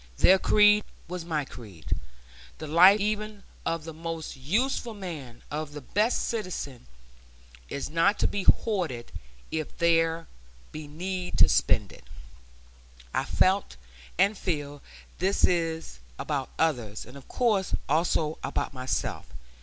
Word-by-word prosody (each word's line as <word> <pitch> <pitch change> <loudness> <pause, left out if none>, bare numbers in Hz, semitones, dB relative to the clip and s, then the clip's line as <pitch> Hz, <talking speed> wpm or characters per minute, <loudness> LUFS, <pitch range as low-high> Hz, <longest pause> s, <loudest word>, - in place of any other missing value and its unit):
Their 190 +1 +6
creed 210 +1 +5 0.2
was 180 0 -5
my 155 -4 -1
creed. 105 -11 -11 0.7
The 155 - -6
life 180 +7 +7
even 210 0 -2 0.2
of 165 -1 -1
the 165 0 -7
most 165 0 -5
useful 220 - -1
man, 155 - -7
of 150 0 -4
the 145 - -7
best 210 - +1
citizen, 180 - -4 0.8
is 140 - -3
not 165 +6 +3
to - - +2
be 200 - -2
hoarded 175 - +1 0.4
if 155 -1 -4
there 165 -1 +2 0.5
be 155 -1 -7
need 180 +4 -4
to - - +8
spend - - +2
it. - - -15 1.1
I - - +1
felt, - - +2 0.4
and 200 +4 +4
feel, 145 -7 -3 0.4
this 190 +3 +1 0.7
about 140 -3 -2
others; 120 -10 0
and 125 - -13
of 140 - -12
course 215 -6 +1
also 155 0 +1
about - - -2
myself. 130 0 -2
165 Hz, 130 wpm, -28 LUFS, 145-195 Hz, 1.1 s, to